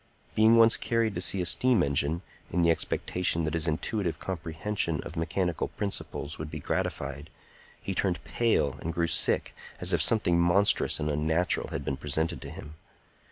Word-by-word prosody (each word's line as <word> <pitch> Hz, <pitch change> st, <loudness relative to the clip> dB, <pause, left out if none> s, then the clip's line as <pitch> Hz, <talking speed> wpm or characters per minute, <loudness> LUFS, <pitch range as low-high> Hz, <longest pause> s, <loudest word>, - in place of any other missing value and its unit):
Being 110 Hz, +1 st, +5 dB
once 115 Hz, 0 st, +6 dB
carried 115 Hz, -3 st, 0 dB
to -, -, -3 dB
see 95 Hz, -2 st, +2 dB
a -, -, -3 dB
steam 125 Hz, +6 st, +3 dB
engine, 70 Hz, +5 st, 0 dB, 0.3 s
in 85 Hz, 0 st, +1 dB
the 85 Hz, -, +5 dB
expectation 85 Hz, 0 st, 0 dB
that 80 Hz, -1 st, -2 dB
his 85 Hz, 0 st, 0 dB
intuitive 85 Hz, +3 st, -1 dB
comprehension 85 Hz, -1 st, -3 dB
of 80 Hz, -, -9 dB
mechanical 85 Hz, +1 st, -1 dB
principles 100 Hz, -7 st, -4 dB
would 75 Hz, 0 st, -5 dB
be 75 Hz, 0 st, -6 dB
gratified, 70 Hz, +1 st, -3 dB, 0.5 s
he 95 Hz, -, -4 dB
turned 90 Hz, -1 st, -1 dB
pale 75 Hz, -, 0 dB
and 80 Hz, 0 st, -4 dB
grew 85 Hz, -, +1 dB
sick, 85 Hz, -, +2 dB, 0.3 s
as -, -, +2 dB
if -, -, +3 dB
something 90 Hz, -6 st, +3 dB
monstrous 85 Hz, +4 st, +3 dB
and 75 Hz, -, -2 dB
unnatural 80 Hz, +4 st, 0 dB
had -, -, -5 dB
been 65 Hz, -, -2 dB
presented 80 Hz, +3 st, -2 dB
to -, -, -7 dB
him. 75 Hz, -, -10 dB
85 Hz, 170 wpm, -28 LUFS, 75-100 Hz, 0.5 s, once